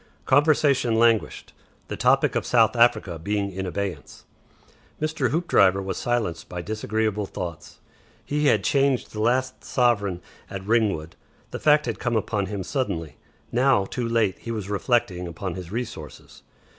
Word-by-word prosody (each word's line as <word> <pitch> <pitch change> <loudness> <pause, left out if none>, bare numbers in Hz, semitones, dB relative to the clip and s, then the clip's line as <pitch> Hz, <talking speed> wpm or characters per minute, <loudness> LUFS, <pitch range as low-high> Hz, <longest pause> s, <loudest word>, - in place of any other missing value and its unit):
Conversation 140 -4 +3
languished, 115 -1 +1 0.3
the - - -4
topic - - +3
of - - 0
South 115 -1 +3
Africa 115 -8 +2
being 100 +3 -2
in 95 0 -4
abeyance. 100 0 -5 0.7
Mr. 155 +1 -1
Hoopdriver 100 - +3
was 95 0 -4
silenced 115 -9 -2
by 90 - -5
disagreeable 105 +1 -2
thoughts. 85 -5 -7 0.5
He 150 0 0
had - - +3
changed 140 -3 +1
the 105 - -4
last 130 +3 0
sovereign 105 -8 +1 0.3
at 95 -1 -7
Ringwood. 100 -8 0 0.4
The - - -5
fact 150 0 +4
had 115 -3 -3
come 120 -1 -1
upon 105 -2 -1
him 100 -1 -4
suddenly. 85 - -3 0.3
Now 125 -4 +3
too 120 +3 -3
late 110 -6 +1
he - - -9
was 105 -3 -4
reflecting 100 -4 0
upon 90 +2 -5
his 90 -1 -8
resources. 110 -10 -7
110 Hz, 145 wpm, -24 LUFS, 95-125 Hz, 0.7 s, fact